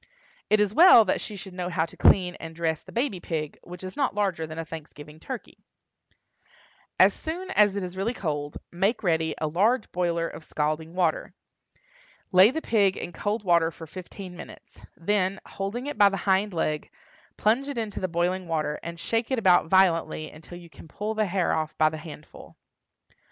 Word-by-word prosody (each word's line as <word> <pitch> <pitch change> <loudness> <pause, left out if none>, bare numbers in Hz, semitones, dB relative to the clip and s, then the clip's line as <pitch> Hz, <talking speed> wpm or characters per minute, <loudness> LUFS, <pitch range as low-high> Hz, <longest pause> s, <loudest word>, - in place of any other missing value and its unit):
It 215 - +4
is 210 -1 +2
well 320 -7 +8
that 185 - 0
she 210 - -6
should 190 -1 -9
know 180 -1 -3
how 165 -2 0
to - - -14
clean 180 -2 +4
and 165 0 -8
dress 160 -2 -1
the - - -14
baby 235 -6 -1
pig, 155 -3 -4
which 180 +1 -11
is 185 - -7
not 275 -7 0
larger 190 -6 -1
than 155 +1 -8
a 165 - -4
Thanksgiving 150 -1 -10
turkey. 255 +6 -8 1.4
As - - +7
soon 360 +4 -6
as 205 - +4
it 200 - -2
is 180 0 -6
really 210 +6 -2
cold, 145 -6 -3
make 195 +7 0
ready 160 -3 +1
a 155 - -2
large 210 +10 +1
boiler 170 -2 0
of 165 - -9
scalding 155 +2 -2
water. - - 0 1.0
Lay 185 +3 +7
the 315 +5 -4
pig 200 -4 +2
in - - -5
cold 210 +4 -2
water 170 -3 +3
for 165 0 -10
fifteen 185 +2 -9
minutes; - - -12 0.2
then, 190 +2 0
holding 200 +6 -5
it 290 - -5
by 205 -1 +7
the 195 - -3
hind 195 +2 +1
leg, 155 -3 -2 0.5
plunge 235 +6 +2
it 285 -3 -5
into 220 -3 -3
the 185 - -1
boiling 175 +2 -1
water, 155 -2 -1
and 170 0 -7
shake 225 +6 -1
it 260 - 0
about 185 -7 +4
violently 165 -4 +2
until 160 +3 -12
you 175 -1 -12
can - - -14
pull 210 +7 -4
the 215 -1 0
hair 185 -1 0
off 155 -1 -2
by 155 - +4
the 155 - -6
handful. 155 -1 -12
185 Hz, 195 wpm, -26 LUFS, 165-210 Hz, 1.4 s, well